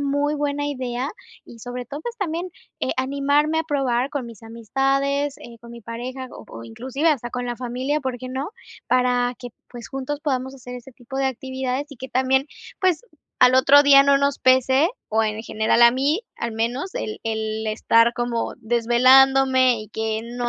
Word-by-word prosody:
muy 285 +1 0
buena 290 0 -2
idea 255 -1 -3 0.4
y 230 - -14
sobre 245 +1 -6
todo, 285 +3 -7
pues 475 +8 -6
también, 350 -1 -3 0.3
eh, - - -1
animarme 285 +4 +1
a - - -2
probar 270 -4 0
con 280 -4 -4
mis 230 -2 -12
amistades, 275 +5 -1
eh, 235 -1 -12
con 235 0 -13
mi 235 -1 -11
pareja 255 +3 -6
o - - -11
o 115 0 -9
inclusive 260 - -2
hasta 240 -5 -1
con 250 0 -4
la 240 -1 -4
familia, 255 +4 -2
¿por 260 -3 -3
qué 255 - -7
no? 270 +7 -4 0.4
Para 250 -1 +1
que, 245 - -8 0.2
pues, 240 -2 -10
juntos 270 +2 -4
podamos 265 -3 -2
hacer 250 -1 -10
ese 250 +1 -11
tipo 265 +2 -8
de 270 - +1
actividades 260 +1 -3
y 280 - -11
que 260 +2 -8
también, 265 +2 +1 0.3
pues, 370 +2 +2 0.4
al 250 0 +6
otro 280 +2 +7
día 275 -1 +7
no 280 0 +4
nos 280 0 0
pese 260 +4 +4 0.2
o 220 +1 +1
en 215 0 -2
general 220 +1 +1
a 235 - +9
mí, 285 - 0
al 235 -1 -4
menos 240 - -3
el 215 - -4
el 220 0 -3
estar 230 +2 +3
como 240 -1 -2
desvelándome 255 +2 +4
y 215 - -10
que 220 0 -3
no 240 +1 -4
255 Hz, 185 wpm, -22 LUFS, 235-280 Hz, 0.4 s, a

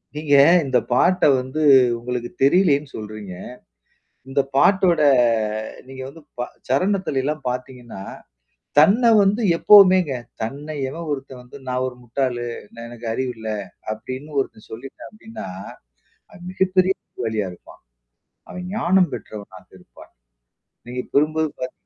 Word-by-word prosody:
நீங்க 150 -1 -1 0.3
இந்த 130 -2 +2 0.2
பாட்ட 180 +8 +3 0.2
வந்து 130 +4 -4 0.4
உங்களுக்கு 120 0 -4
தெரியலைன்னு 145 -2 +3
சொல்றீங்க. 105 -3 -8 1.0
இந்த 140 +1 +2
பாட்டோட 180 +1 +4 0.9
நீங்க 130 0 -9
வந்து 160 +4 -12 0.2
ப - - -3 0.3
சரணத்தில 180 0 0
எல்லாம் 150 +1 -3
பாத்தீங்கன்னா, 125 -4 -7 0.8
தன்ன 205 +10 +5 0.2
வந்து 200 +4 +2 0.2
எப்போவுமேங்க. 185 -7 +6 0.3
தன்னை 145 +6 -6 0.2
எவன் 165 +4 -7
ஒருத்தன் 135 -2 -6
வந்து 125 +3 -13
நான் 125 0 -1
ஒரு 125 - -7
முட்டாளு! 120 0 -2 0.3
நான் 115 0 -9
எனக்கு 120 -1 -9
அறிவு 130 +1 -2
இல்ல! 110 0 -6 0.4
அப்பிடின்னு 130 +7 -7
ஒருத்தன் 110 - -10
சொல்லிட்டான் 130 +4 -10
அப்பிடின்னா, 225 - -10 0.9
அ - - -15 0.2
மிகப்பெரிய 185 0 +2
புத்திசாலியா 110 -5 -4
இருப்பான். 90 - -17 0.7
அவன் 180 0 -7
ஞானம் 185 -2 +3
பெற்றவனாக 100 -5 -10
இருப்பான். 90 - -18 0.8
நீங்க 125 +1 -4
கூறும்போது 155 +2 +2
பாத்தீங்கன்னா 125 -7 -7
135 Hz, 120 wpm, -21 LUFS, 120-170 Hz, 1.0 s, எப்போவுமேங்க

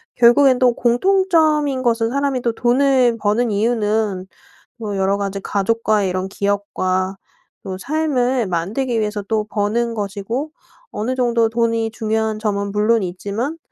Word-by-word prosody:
결국엔 250 +2 +5
또 250 -2 +4
공통점인 305 0 +2
것은 230 -1 +1
사람이 275 -1 -1
또 235 - 0
돈을 250 0 +2
버는 215 +3 +1
이유는 210 -3 0 0.5
뭐 210 -4 -4
여러 195 +1 +1
가지 200 -1 -3
가족과의 210 0 0
이런 185 +1 -3
기억과 195 -1 -1 0.5
또 190 -1 -5
삶을 260 -3 0
만들기 220 +8 -1
위해서 210 -1 -2
또 215 0 -1
버는 230 +3 -1
것이고 210 +8 -4 0.4
어느 235 +5 -2
정도 235 -3 +2
돈이 230 -1 0
중요한 220 -1 -1
점은 200 -2 -2
물론 215 +1 +2
있지만 205 - -4
225 Hz, 290 characters per minute, -19 LUFS, 205-250 Hz, 0.5 s, 결국엔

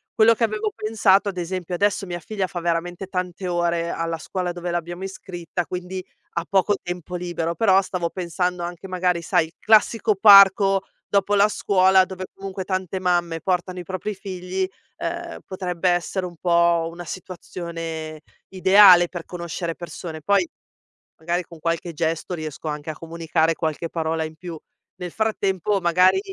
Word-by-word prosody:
Quello 230 +1 +6
che 230 - -2
avevo 215 -1 0
pensato, 205 -2 +3
ad 185 - -7
esempio, 180 0 -4
adesso 200 +1 +1
mia 175 -1 -5
figlia 195 +2 -3
fa 175 - -5
veramente 175 +2 -2
tante 180 -1 -4
ore 170 -1 0
alla 165 -1 -2
scuola 180 +2 -3
dove 175 0 -5
l'abbiamo 175 +2 -4
iscritta, 175 -3 -5
quindi 180 +1 -5 0.3
ha 170 - -1
poco 200 +1 +3
tempo 180 0 -6
libero, 170 -1 -3
però 195 -4 +4
stavo 180 -3 -3
pensando 180 0 -2
anche 175 +2 -6
magari, 180 -2 0
sai, 160 - +2
il 165 - -20
classico 220 0 +4
parco 195 -1 +7 0.3
dopo 200 +1 +2
la 200 +1 +5
scuola, 190 -2 +4
dove 185 0 -7
comunque 195 -1 -6
tante 185 -1 -2
mamme 175 -2 0
portano 180 0 -1
i - - -6
propri 190 +3 -4
figli, 185 -1 -3 0.3
ehm, - - -5
potrebbe 180 -1 -1
essere 175 +2 0
un 175 -1 -8
po' 170 -1 +2
una 175 0 -9
situazione 165 -3 -6 0.3
ideale 190 -2 +7
per 175 -2 -6
conoscere 170 -1 -4
persone. 165 -1 -7
Poi 200 - +3 0.7
magari 175 +2 -1
con 170 -2 -14
qualche 165 +1 -2
gesto 165 +3 -2
riesco 155 -1 -6
anche 150 +1 -5
a - - -2
comunicare 165 0 0
qualche 160 +1 -3
parola 160 -1 -1
in 155 0 -7
più. 170 -2 -8 0.4
Nel 180 -2 -6
frattempo 205 -2 0
magari 180 - +4
180 Hz, 160 wpm, -23 LUFS, 170-190 Hz, 0.7 s, parco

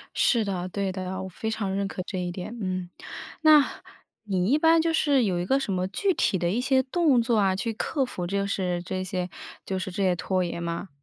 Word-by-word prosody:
是 230 -4 +3
的， 185 -2 -3
对 195 0 -2
的， 185 0 -4
我 - - -5
非 220 +5 -4
常 200 -3 -2
认 200 0 0
可 190 - -5
这 185 - -4
一 175 -1 -2
点。 185 +6 -6
嗯。 185 -2 -3 0.5
那 305 -3 +5 0.4
你 190 0 0
一 290 - +5
般 325 +1 +5
就 330 0 0
是 280 -5 +3
有 180 -3 0
一 175 - -2
个 270 +6 +2
什 205 -7 -2
么 185 0 0
具 385 - 0
体 190 - +1
的 175 0 0
一 235 +5 0
些 265 0 +3
动 280 -2 +3
作 230 -1 +1
啊， 190 -2 +3
去 225 +3 -2
克 270 +4 -1
服 180 -7 -5
就 200 +2 0
是 180 -3 -1
这 185 +1 -3
些 180 -1 -3 0.4
就 190 - -2
是 190 - -4
这 195 - -2
些 185 -2 +3
拖 185 +1 0
延 170 0 -4
吗？ 170 +3 -4
195 Hz, 250 characters per minute, -26 LUFS, 185-245 Hz, 0.5 s, 那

